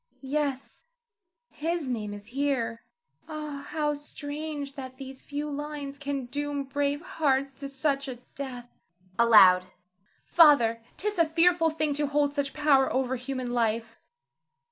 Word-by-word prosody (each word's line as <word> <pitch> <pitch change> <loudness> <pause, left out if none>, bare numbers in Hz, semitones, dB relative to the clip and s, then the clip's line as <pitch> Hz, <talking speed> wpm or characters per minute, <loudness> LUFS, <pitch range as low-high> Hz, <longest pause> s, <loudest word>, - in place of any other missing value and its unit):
_] - - -38
Yes, 275 0 -3 0.7
his 330 -1 -2
name 220 -5 -3
is 205 0 -8
here. 265 -5 -1 0.5
Ah, 300 -2 -6
how 300 -2 0
strange 290 0 -6
that 260 -2 -8
these 265 -1 -9
few 290 +1 -4
lines 290 -1 -5
can 280 -2 -3
doom 290 +2 -3
brave 285 +2 -1
hearts 275 -5 0
to 275 -1 -5
such 275 0 -1
a 260 - -4 0.2
death! 255 -3 -6 0.5
[Aloud.] 190 -6 +7 0.6
Father, 270 -9 +5 0.2
'tis 420 -2 -1
a 335 - +6
fearful 330 +1 +3
thing 310 -2 -1
to 295 +1 0
hold 285 0 +1
such 285 -2 -1
power 290 -3 +3
over 260 0 0
human 255 -1 -4
life. 230 -1 -1
280 Hz, 140 wpm, -28 LUFS, 260-295 Hz, 0.7 s, Aloud